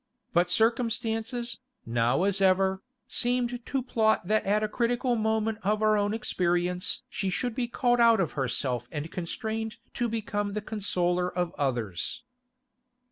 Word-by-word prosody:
But 175 +1 +3
circumstances, 230 +2 0 0.3
now 120 +7 +2
as 195 0 +1
ever, 190 0 +3 0.3
seemed 245 0 0
to 265 +1 -2
plot 220 -6 +2
that 215 +1 +2
at 210 +2 +2
a - - +2
critical 240 +3 0
moment 220 -1 0
of 210 +2 +1
her 215 0 +4
own 205 0 +1
experience 180 -5 0
she 195 -3 -2
should 245 +6 -1
be 240 +1 -1
called 245 0 +1
out 230 -2 +6
of 175 -5 +1
herself 125 -2 -1
and 150 +1 -4
constrained 220 +5 -4 0.2
to 240 -1 -1
become 205 -2 -2
the 210 - -2
consoler 180 -4 0
of 175 -1 -2
others. 120 - -2
210 Hz, 145 wpm, -28 LUFS, 180-230 Hz, 0.3 s, out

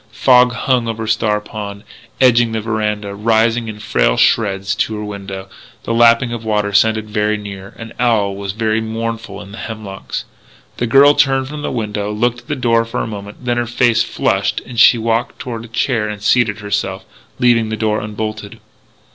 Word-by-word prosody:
Fog 125 -1 +4
hung 120 0 0
over 115 0 -3
Star 110 -1 +1
Pond, 105 -1 -7 0.4
edging 120 -3 +4
the 110 - -1
veranda, 105 -2 -2
rising 115 +2 +1
in 110 -1 -6
frail 105 - +1
shreds 100 -3 +2
to 110 - -1
her 105 - -5
window. 100 -2 -7 0.4
The 115 - -2
lapping 115 +1 +4
of 120 - -4
the 110 - -10
water 105 -1 0
sounded 110 +1 +3
very 105 0 0
near. 100 -2 -9
An 115 0 -9
owl 110 -5 +2
was 100 0 -5
very 110 0 0
mournful 115 -1 -4
in 100 - -13
the 105 - -9
hemlocks. 105 -4 -6 0.5
The 120 - -1
girl 140 +4 +6
turned 135 -2 +2
from 150 0 -6
the - - -3
window, 105 -3 -3
looked 120 +3 0
at - - -21
the 145 - -2
door 115 -3 +2
for 115 +2 -4
a - - -2
moment, 105 +2 -8
then 120 -1 0
her 120 0 -1
face 120 0 +2
flushed - - 0
and 120 -2 -5
she 120 - +7
walked 115 +3 -1
toward 115 -3 -6
a - - -11
chair 115 -1 -1
and 105 -1 -5
seated 110 -2 +2
herself, 95 -2 -2 0.3
leaving 115 -3 +3
the 110 - -3
door 110 -1 0
unbolted. 105 0 -5
110 Hz, 190 wpm, -17 LUFS, 105-120 Hz, 0.5 s, she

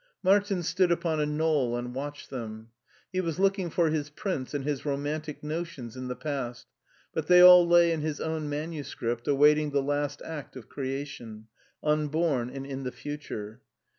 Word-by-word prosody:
Martin 195 -1 +3
stood 180 +1 +2
upon 170 -2 0
a 150 - +1
knoll 150 -5 +1
and 125 0 -5
watched 145 +2 -6
them. 110 -3 -6 0.4
He 185 - +1
was 165 -3 -3
looking 195 -2 +1
for 165 -1 +2
his 150 -2 -1
prince 150 -3 -3
and 140 -1 -2
his 145 -3 -2
romantic 150 +1 -3
notions 150 -7 -5
in 130 0 -5
the 125 - -3
past, 130 -5 -4 0.5
but 155 -2 -2
they 180 0 +7
all 180 -1 +10
lay 170 0 +6
in 160 -2 -1
his 155 -1 -2
own 160 -2 -2
manuscript 145 -6 -4
awaiting 150 +2 +4
the 140 -1 +1
last 145 0 -2
act 155 -5 -7
of 125 -5 -10
creation: 130 -5 -5 0.4
unborn 150 -4 +1
and 135 +1 -6
in 135 -1 -5
the 130 -1 -4
future. 125 -4 -7
145 Hz, 170 wpm, -28 LUFS, 130-160 Hz, 0.5 s, all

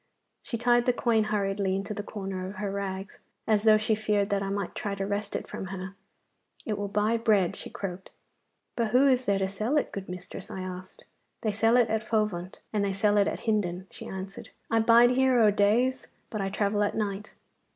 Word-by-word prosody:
She 230 - -4
tied 240 +1 +3
the 250 - +4
coin 230 -3 +2
hurriedly 200 -2 0
into 195 +2 -3
the 205 - -4
corner 195 -3 -5
of 195 - -8
her 200 0 -3
rags, 195 0 -5 0.3
as 215 -2 +3
though 215 0 +6
she 215 +1 +1
feared 210 -2 0
that 200 -1 +1
I 195 - -2
might 200 -2 -3
try 200 -1 -3
to 195 0 -3
wrest 205 +1 -3
it - - -3
from - - -6
her. 190 0 -6 0.7
'It 215 - -1
will 205 0 -3
buy 210 +3 +1
bread,' 210 -6 +2
she - - -8
croaked. 190 -1 -6 0.7
'But 230 -2 +1
who 250 +5 +4
is 255 -1 +3
there 200 -1 +2
to 190 0 0
sell 215 +9 -1
it, - - 0
good 195 -2 -6
mistress?' 180 +1 -8
I 190 - -5
asked. 185 - -8 0.4
'They 215 - 0
sell 225 +3 +3
it 240 -2 +4
at 220 -1 +1
Fovant, 210 -5 -1 0.2
and 210 -1 +1
they 200 -1 0
sell 205 +1 +2
it 200 - +4
at - - -3
Hindon,' 190 -5 -1
she - - -9
answered. 190 +1 -7 0.2
'I 225 - +4
bide 235 +2 +6
here 260 -1 +3
o' 215 -2 +6
days, 230 +6 +2 0.2
but 215 - -2
I 195 - -1
travel 205 +1 0
at 205 - +1
night. 205 -1 -3
205 Hz, 215 wpm, -28 LUFS, 195-220 Hz, 0.7 s, though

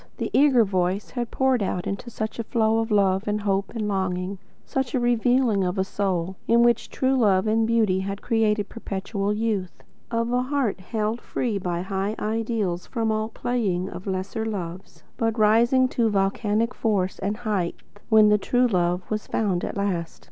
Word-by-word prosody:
The - - -3
eager 270 -4 +5
voice 185 -1 -1
had 240 +3 -3
poured 265 -3 +1
out 180 -2 -2
into 200 +5 -4
it - - -7
such 220 +1 -4
a - - 0
flow 225 0 +1
of 225 0 -1
love 195 -2 +2
and 210 0 0
hope 195 -1 0
and 215 -2 -2
longing; 190 -1 -2 0.3
such 265 -1 -2
a - - +2
revealing 240 -3 +2
of 180 +1 -1
a 190 - +2
soul 190 -2 -2
in 235 +1 +5
which 240 0 +2
the - - -15
true 260 0 +2
love 205 -6 +3
of 220 +1 +2
beauty 220 -5 +2
had 195 +1 -4
created 215 -3 +1
perpetual 200 -2 -3
youth; 210 -4 -2 0.3
of 230 +1 -1
a 250 - +2
heart 255 -6 -1
held 215 +4 -2
free 220 -5 -2
by 175 -1 -2
high 195 +2 -2
ideals 215 -5 -2
from 225 -3 -1
all 215 0 -1
playing 210 -7 -1
with 185 - -8
lesser 190 +4 -2
loves, 185 -4 -6
but 225 0 0
rising 235 +4 +4
to 230 -2 +1
volcanic 210 +3 0
force 195 -5 -1
and 205 +2 -2
height 210 -7 -1 0.3
when 215 -2 +6
the 210 0 +4
true 245 +5 +2
love 180 -4 +1
was 215 0 -2
found 195 -5 0
at - - -4
last. 185 -5 -2
210 Hz, 185 wpm, -24 LUFS, 190-230 Hz, 0.3 s, when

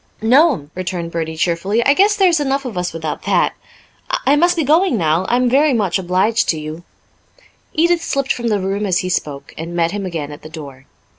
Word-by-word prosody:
"No'm," 245 - +3
returned 175 -2 -4
Bertie 160 -1 -4
cheerfully. 180 +8 0
"I 280 - +5
guess 405 +6 +3
there's 365 -6 +3
enough 275 -1 -1
of 240 -6 -5
us 180 0 -2
without 160 -2 -5
that. - - +2 0.7
I 280 - +4
must 345 +3 +2
be 325 - +1
going 310 -1 +3
now. 165 +1 +1
I'm 250 +1 +2
very 275 +2 +3
much 200 -4 0
obliged 190 +5 +1
to 160 - 0
you." 155 +2 -7 0.9
Edith 340 +1 +2
slipped 275 -1 0
from 240 -1 -4
the 210 -3 +1
room 195 +2 -2
as 180 -2 +1
he - - -2
spoke, 145 -5 -3
and 165 +2 -6
met 170 -1 +1
him 200 -1 -4
again 155 -5 -5
at 145 - -10
the 155 - -11
door. 140 -4 -10
195 Hz, 205 wpm, -18 LUFS, 165-275 Hz, 0.9 s, I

